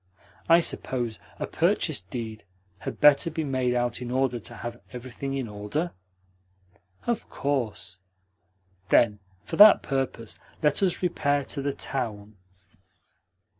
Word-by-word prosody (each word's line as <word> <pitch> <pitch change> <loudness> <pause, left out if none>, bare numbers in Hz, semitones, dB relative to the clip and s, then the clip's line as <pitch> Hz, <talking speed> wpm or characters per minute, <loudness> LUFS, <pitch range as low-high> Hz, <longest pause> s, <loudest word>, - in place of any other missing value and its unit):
I 165 +1 +7
suppose 120 -8 -2 0.2
a - - -2
purchase - - +1
deed 110 +3 -6 0.4
had - - -6
better 150 +3 +6
be 160 0 -3
made 130 -3 0
out 120 0 -1
in 125 - -5
order 130 -1 0
to 120 +2 -8
have 120 +1 -7
everything 130 +2 -5
in 135 -3 -2
order?" 105 +12 -3 1.1
"Of 235 -2 -2
course." 105 -10 -3 0.9
"Then 105 -3 +4 0.2
for - - -5
that 210 0 +9
purpose 135 -5 -3 0.2
let 150 +3 +3
us 185 -1 +1
repair 145 -5 +1
to 140 +1 -3
the 140 0 -1
town." 110 -5 -4
130 Hz, 130 wpm, -26 LUFS, 115-145 Hz, 1.1 s, that